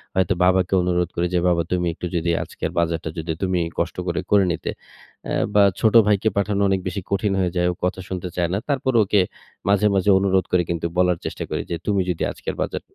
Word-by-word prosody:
হয়তো 95 -1 +2
বাবাকে 90 0 +3
অনুরোধ 90 -1 0
করি 85 +1 0
যে, 90 - +3
"বাবা 85 -1 +3
তুমি 90 -1 +1
একটু 90 - -7
যদি 85 0 0
আজকের - - -5
বাজারটা 85 -1 -1
যদি 80 0 -3
তুমিই 90 -3 0
কষ্ট 85 0 -1
করে 85 0 -1
করে 100 -1 +6
নিতে" - - -4 0.6
অ্যা - - -2 0.2
বা 105 - +7 0.2
ছোট 110 0 +3
ভাইকে 105 +1 +3
পাঠানো 100 0 +1
অনেক 95 0 +2
বেশি 100 - -3
কঠিন 100 0 +1
হয়ে 90 -2 +1
যায়, 90 0 +2
ও - - -4
কথা 90 +1 -2
শুনতে 90 -1 -4
চায় 85 -1 +1
না। - - +1
তারপর 130 -2 0
ওকে 100 +1 +2 0.5
মাঝে, 100 +1 +3
মাঝে 95 +1 +2
অনুরোধ 95 -1 +2
করে 90 -1 +3
কিন্তু 85 -1 -2
বলার 90 -2 +3
চেষ্টা - - -4
করি - - -2
যে, - - 0
"তুমি 100 -2 +2
যদি 90 - -1
আজকের - - -6
বাজার"... - - -2
90 Hz, 220 wpm, -22 LUFS, 85-100 Hz, 0.6 s, বা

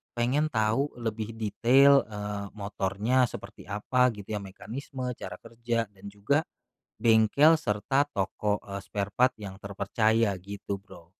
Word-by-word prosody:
pengen 130 +6 +1
tahu 110 +6 +1
lebih 110 0 -3
detail, 130 +6 +5
eee, 105 -1 -5
motornya 105 +4 0
seperti - - -10
apa, 125 +5 +2
gitu 105 0 -9
ya, - - -3
mekanisme, 125 +6 -6
cara - - -7
kerja, 115 -2 -2
dan 100 -1 -17
juga 140 +10 +1 0.6
bengkel, 115 +8 +5
serta 135 +2 +1
toko, 105 +1 -1
eee, 100 0 -6
sparepart 105 +6 +1
yang 95 -1 -7
terpercaya 105 +3 +1
gitu, 100 +2 -6
Bro. 90 -4 -16
110 Hz, 130 wpm, -28 LUFS, 100-125 Hz, 0.6 s, detail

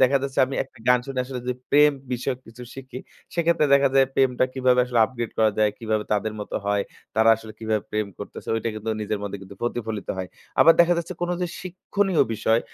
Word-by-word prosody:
দেখা 130 +2 +5
যাচ্ছে 135 -1 -4
আমি 135 - -5
একটা 130 - -21
গান 125 0 +6
শুনে 135 -2 -2
আসলে 125 -1 -6
যে - - +2 0.2
প্রেম 150 +1 +6 0.2
বিষয়ক 125 +1 -2
কিছু 115 +2 -12
শিখি, 130 -1 -8 0.4
সেক্ষেত্রে 170 -2 +2
দেখা 140 0 +4
যায় 135 -1 +6
প্রেমটা 130 -1 +3
কিভাবে 130 -1 +3
আসলে 125 -1 -1
upgrade 120 -1 -5
করা 110 -1 +4
যায়, 105 -1 +4
কিভাবে 110 -2 -1
তাদের 105 +1 0
মত 105 - -8
হয়, 100 0 +1 0.3
তারা 110 +1 +4
আসলে 110 0 -11
কিভাবে 110 -2 -1
প্রেম 105 -1 -1
করতেছে। 105 - -9
ঐটা 115 - -2
কিন্তু 110 +1 -4
নিজের 105 0 -2
মধ্যে 100 0 -4 0.3
প্রতিফলিত 110 -3 -3
হয়। 95 -1 -4 0.3
আবার 165 - +9
দেখা 170 +1 +5
যাচ্ছে, 170 +2 -4
কোন 175 - -1
যে - - +1 0.2
শিক্ষণীয় 185 0 0
বিষয় 110 +2 +2
125 Hz, 205 wpm, -24 LUFS, 110-140 Hz, 0.4 s, আবার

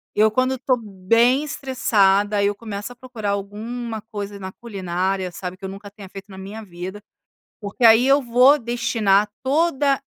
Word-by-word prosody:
Eu 215 +1 +4
quando 255 +3 +1
estou 255 0 0
bem 230 +6 +2
estressada 205 -8 +1
eu 205 0 +1
começo 210 +1 -6
a 245 - -11
procurar 235 -6 -5
alguma 220 +3 -5
coisa 205 -2 -7
na 190 -1 -6
culinária, 190 -3 -3
sabe? 180 +1 -6
Eu 190 - -5
eu 190 - -7
nunca 200 +1 -10
tenha 200 -1 -12
feito 195 +1 -11
na 190 - -11
minha 205 +4 -8
vida, 185 +2 -8 0.6
porque 205 +2 -8
aí 225 +3 +7
eu 275 +1 +5
vou 255 +4 +5
destinar 225 -4 +1 0.2
toda 280 -1 +2
215 Hz, 165 wpm, -22 LUFS, 195-245 Hz, 0.6 s, aí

